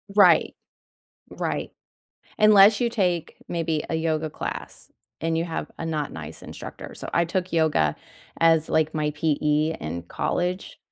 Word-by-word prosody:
Right. 185 Hz, -5 st, +5 dB, 0.7 s
Right. -, -, -3 dB, 0.7 s
Unless 210 Hz, -1 st, +7 dB
you 240 Hz, -, +2 dB
take 180 Hz, -7 st, -1 dB
maybe 165 Hz, -2 st, -1 dB
a -, -, -1 dB
yoga 160 Hz, -1 st, -1 dB
class -, -, -7 dB, 0.3 s
and 165 Hz, +1 st, 0 dB
you 165 Hz, -, 0 dB
have 165 Hz, -1 st, -4 dB
a -, -, -4 dB
not 155 Hz, -3 st, -2 dB
nice 80 Hz, -2 st, -8 dB
instructor. -, -, -9 dB
So, -, -, -8 dB
I 170 Hz, -, +3 dB
took 180 Hz, +2 st, -2 dB
yoga 155 Hz, -, +2 dB, 0.5 s
as, 165 Hz, -1 st, +4 dB
like, 160 Hz, 0 st, +1 dB
my 150 Hz, -1 st, 0 dB
PE 150 Hz, +1 st, +1 dB
in 85 Hz, +2 st, -4 dB
college, 180 Hz, -, -2 dB
160 Hz, 145 wpm, -25 LUFS, 155-175 Hz, 0.7 s, Unless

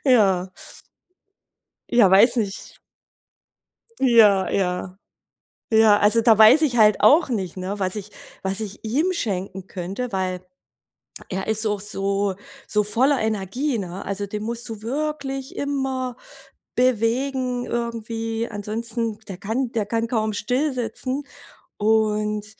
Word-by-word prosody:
Ja. 195 Hz, -8 st, +3 dB, 1.4 s
Ja, 235 Hz, -6 st, +5 dB
weiß 220 Hz, +6 st, +6 dB
nicht. 205 Hz, -4 st, -4 dB, 1.2 s
Ja, 220 Hz, -7 st, +5 dB
ja. 185 Hz, 0 st, -2 dB, 0.8 s
Ja, 220 Hz, -2 st, +6 dB
also 210 Hz, +3 st, +4 dB
da 225 Hz, -2 st, +5 dB
weiß 220 Hz, +9 st, +7 dB
ich 265 Hz, -5 st, +1 dB
halt 215 Hz, -2 st, +5 dB
auch 310 Hz, 0 st, +5 dB
nicht, 195 Hz, -8 st, -3 dB
ne, 190 Hz, +2 st, -5 dB
was 185 Hz, +1 st, -1 dB
ich 210 Hz, 0 st, -7 dB, 0.3 s
was 190 Hz, +1 st, -1 dB
ich 215 Hz, -1 st, -7 dB
ihm 300 Hz, +12 st, 0 dB
schenken 190 Hz, -, -4 dB
könnte, 195 Hz, +8 st, -5 dB
weil 185 Hz, -1 st, -2 dB, 0.9 s
er 190 Hz, +2 st, -4 dB
ist 220 Hz, 0 st, +1 dB
auch 205 Hz, -2 st, -2 dB
so 200 Hz, -1 st, +1 dB, 0.3 s
so 210 Hz, 0 st, +1 dB
voller 255 Hz, +7 st, +2 dB
Energie, 220 Hz, +5 st, -1 dB
ne? 185 Hz, -1 st, -6 dB
Also, 200 Hz, +1 st, -3 dB
den 210 Hz, +1 st, -6 dB
musst 235 Hz, +1 st, -4 dB
du 220 Hz, -2 st, -7 dB
wirklich 270 Hz, +1 st, -4 dB
immer 265 Hz, -3 st, -2 dB, 0.6 s
bewegen 250 Hz, +1 st, 0 dB
irgendwie. 230 Hz, -1 st, -3 dB
Ansonsten, 220 Hz, +1 st, -3 dB
der 190 Hz, -, -7 dB
kann 230 Hz, +6 st, -2 dB
der 220 Hz, -3 st, -1 dB
kann 230 Hz, +2 st, -1 dB
kaum 220 Hz, -3 st, -1 dB
still 250 Hz, +9 st, -1 dB
sitzen. 255 Hz, +3 st, -3 dB, 0.5 s
Und 210 Hz, -1 st, +1 dB
220 Hz, 125 wpm, -22 LUFS, 200-245 Hz, 1.4 s, weiß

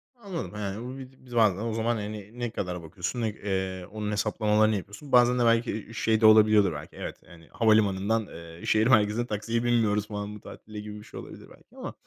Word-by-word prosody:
Anladım, 200 Hz, -8 st, -6 dB
yani, 105 Hz, +1 st, -4 dB
bu 130 Hz, +2 st, -6 dB
biz 130 Hz, 0 st, -12 dB
biz 120 Hz, -1 st, -9 dB
bazen 110 Hz, -5 st, +4 dB
o 110 Hz, +2 st, -3 dB
zaman, 115 Hz, +1 st, 0 dB
hani, 105 Hz, +1 st, -7 dB
ne 120 Hz, -1 st, -1 dB
kadara 90 Hz, -4 st, -4 dB
bakıyorsun, 90 Hz, +8 st, -4 dB
ne 110 Hz, -, +1 dB
eee, 95 Hz, -3 st, -3 dB
onun 105 Hz, -1 st, -3 dB
hesaplamalarını 105 Hz, +1 st, +2 dB
yapıyorsun. 100 Hz, +8 st, -8 dB
Bazen 125 Hz, 0 st, +5 dB
de 120 Hz, -, +3 dB
belki, 115 Hz, +1 st, +3 dB
iii, 110 Hz, +2 st, -6 dB
şey 110 Hz, -1 st, +1 dB
de -, -, +5 dB
olabiliyordur 110 Hz, -4 st, +6 dB
belki 75 Hz, +1 st, -9 dB
evet, -, -, -7 dB
hani, 85 Hz, -2 st, -16 dB
havalimanından, 110 Hz, -1 st, +2 dB
eee, 85 Hz, 0 st, -11 dB
şehir 110 Hz, +2 st, +3 dB
merkezine 110 Hz, 0 st, +3 dB
taksiye 115 Hz, +2 st, -2 dB
binmiyoruz 110 Hz, -4 st, +2 dB
falan 105 Hz, 0 st, -5 dB
bu -, -, -10 dB
tatilde, 105 Hz, -1 st, -10 dB
gibi 105 Hz, 0 st, -7 dB
bir -, -, -12 dB
şey -, -, -9 dB
olabilir -, -, -11 dB
belki -, -, -20 dB
ama -, -, -6 dB
110 Hz, 210 wpm, -27 LUFS, 100-115 Hz, -, olabiliyordur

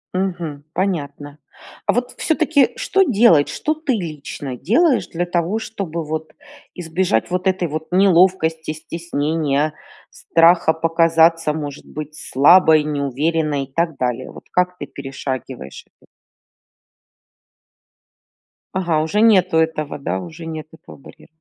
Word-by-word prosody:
Мгм. 175 Hz, -6 st, -3 dB
Понятно. 145 Hz, -6 st, -3 dB, 0.5 s
А -, -, +4 dB
вот 245 Hz, +1 st, -1 dB
всё-таки 310 Hz, -4 st, +2 dB
что -, -, +1 dB
делать? 220 Hz, -, +4 dB
Что 310 Hz, -, -1 dB
ты 310 Hz, -4 st, -2 dB
лично 150 Hz, -, -5 dB
делаешь 265 Hz, -, +2 dB
для 175 Hz, +1 st, -3 dB
того, 175 Hz, +4 st, -1 dB
чтобы 185 Hz, -7 st, -5 dB
вот 155 Hz, 0 st, -5 dB, 0.4 s
избежать 175 Hz, -, -1 dB
вот 180 Hz, +1 st, -1 dB
этой 185 Hz, -2 st, +1 dB
вот 155 Hz, +1 st, -5 dB
неловкости, 180 Hz, -4 st, +3 dB
стеснения, 155 Hz, -2 st, -2 dB, 0.4 s
страха 165 Hz, -1 st, +3 dB
показаться, 165 Hz, -1 st, +3 dB
может 145 Hz, -2 st, -6 dB
быть, 155 Hz, 0 st, -8 dB
слабой, 155 Hz, +2 st, +5 dB
неуверенной, 150 Hz, +1 st, -1 dB
и 135 Hz, -, -28 dB
так 165 Hz, -4 st, -1 dB
далее? 125 Hz, 0 st, -2 dB
Вот -, -, -13 dB
как 180 Hz, 0 st, 0 dB
ты 145 Hz, -, -6 dB
перешагиваешь 135 Hz, -, -7 dB
это? -, -, -29 dB, 2.7 s
Ага, 170 Hz, -4 st, +1 dB
уже 205 Hz, +7 st, 0 dB
нету 185 Hz, -7 st, +4 dB
этого, 155 Hz, -3 st, -1 dB
да, 95 Hz, -8 st, -2 dB
уже 165 Hz, -, -9 dB
нет 155 Hz, -1 st, -6 dB
этого -, -, -14 dB
барьера. 135 Hz, -, -16 dB
165 Hz, 125 wpm, -19 LUFS, 150-185 Hz, 2.7 s, слабой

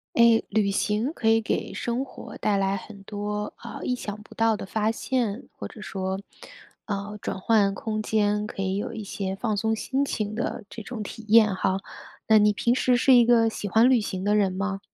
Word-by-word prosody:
诶， 235 Hz, -1 st, +5 dB
旅 210 Hz, -1 st, +2 dB
行 210 Hz, +6 st, 0 dB
可 240 Hz, -8 st, -3 dB
以 225 Hz, 0 st, +5 dB
给 215 Hz, -, -2 dB
生 245 Hz, +3 st, -2 dB
活 -, -, -10 dB
带 210 Hz, -, +1 dB
来 195 Hz, 0 st, +1 dB
很 200 Hz, +1 st, -11 dB
多， 210 Hz, +1 st, -4 dB
呃， -, -, -7 dB
意 250 Hz, -, 0 dB
想 210 Hz, -3 st, -6 dB
不 210 Hz, -, -16 dB
到 225 Hz, -1 st, +3 dB
的 -, -, -7 dB
发 215 Hz, +2 st, 0 dB
现， 235 Hz, -2 st, -2 dB
或 -, -, -5 dB
者 220 Hz, -, -12 dB
说， 190 Hz, -1 st, -3 dB, 0.7 s
呃 205 Hz, 0 st, -4 dB
转 190 Hz, -, -4 dB
换 205 Hz, -1 st, +3 dB
空 215 Hz, +2 st, -3 dB
间， 210 Hz, -1 st, +1 dB
可 195 Hz, -, -6 dB
以 190 Hz, 0 st, -1 dB
有 -, -, -4 dB
一 215 Hz, -, -5 dB
些 195 Hz, -1 st, -4 dB
放 215 Hz, 0 st, -2 dB
松 220 Hz, +2 st, +1 dB
心 270 Hz, +5 st, -1 dB
情 215 Hz, -5 st, -3 dB
的 240 Hz, 0 st, -3 dB
这 225 Hz, -, -8 dB
种 235 Hz, 0 st, -6 dB
体 220 Hz, +2 st, -8 dB
验 215 Hz, -3 st, +6 dB
哈。 190 Hz, 0 st, 0 dB, 0.5 s
那 220 Hz, -, +6 dB
你 210 Hz, 0 st, +5 dB
平 235 Hz, +4 st, +1 dB
时 255 Hz, -1 st, +3 dB
是 255 Hz, +2 st, +5 dB
一 240 Hz, -1 st, +7 dB
个 230 Hz, -1 st, +4 dB
喜 210 Hz, -, -5 dB
欢 225 Hz, +5 st, +5 dB
旅 255 Hz, -2 st, +5 dB
行 190 Hz, -3 st, -4 dB
的 205 Hz, +1 st, +2 dB
人 195 Hz, -3 st, +2 dB
吗？ 195 Hz, +1 st, -2 dB
210 Hz, 230 characters per minute, -25 LUFS, 200-225 Hz, 0.7 s, 一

